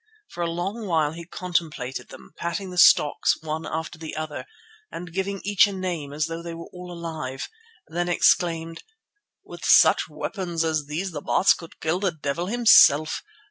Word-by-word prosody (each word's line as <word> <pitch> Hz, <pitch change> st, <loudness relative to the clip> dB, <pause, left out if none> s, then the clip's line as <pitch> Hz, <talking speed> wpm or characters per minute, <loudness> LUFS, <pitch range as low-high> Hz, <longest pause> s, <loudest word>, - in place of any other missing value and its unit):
For 175 Hz, -, -7 dB
a 170 Hz, -, 0 dB
long 195 Hz, +6 st, -4 dB
while 160 Hz, -4 st, +1 dB
he 170 Hz, +1 st, -9 dB
contemplated 155 Hz, -9 st, -3 dB
them, -, -, -13 dB
patting 170 Hz, +3 st, -4 dB
the 180 Hz, -, -2 dB
stocks 150 Hz, -3 st, +5 dB
one 160 Hz, +1 st, -4 dB
after 160 Hz, +1 st, -5 dB
the 160 Hz, -1 st, -7 dB
other 155 Hz, -4 st, -5 dB, 0.5 s
and 170 Hz, 0 st, -8 dB
giving 195 Hz, +1 st, -2 dB
to -, -, -10 dB
each 205 Hz, 0 st, +5 dB
a -, -, -5 dB
name 175 Hz, -7 st, -4 dB
as 150 Hz, +1 st, -1 dB
though 165 Hz, 0 st, -5 dB
they 170 Hz, -1 st, -7 dB
were 170 Hz, -, -8 dB
all 180 Hz, 0 st, -9 dB
alive, 160 Hz, -6 st, -5 dB, 0.4 s
then 175 Hz, +2 st, -2 dB
exclaimed: 165 Hz, -2 st, +1 dB, 0.6 s
"With -, -, -11 dB
such -, -, +5 dB
weapons 175 Hz, -5 st, -3 dB
as 155 Hz, -3 st, -1 dB
these 175 Hz, +6 st, -3 dB
the 150 Hz, -3 st, -6 dB
Baas 190 Hz, -, +4 dB
could 165 Hz, -, -12 dB
kill 160 Hz, +3 st, -1 dB
the 195 Hz, -2 st, 0 dB
devil 155 Hz, +2 st, -3 dB
himself. 195 Hz, -9 st, +5 dB
165 Hz, 180 wpm, -24 LUFS, 155-180 Hz, 0.6 s, stocks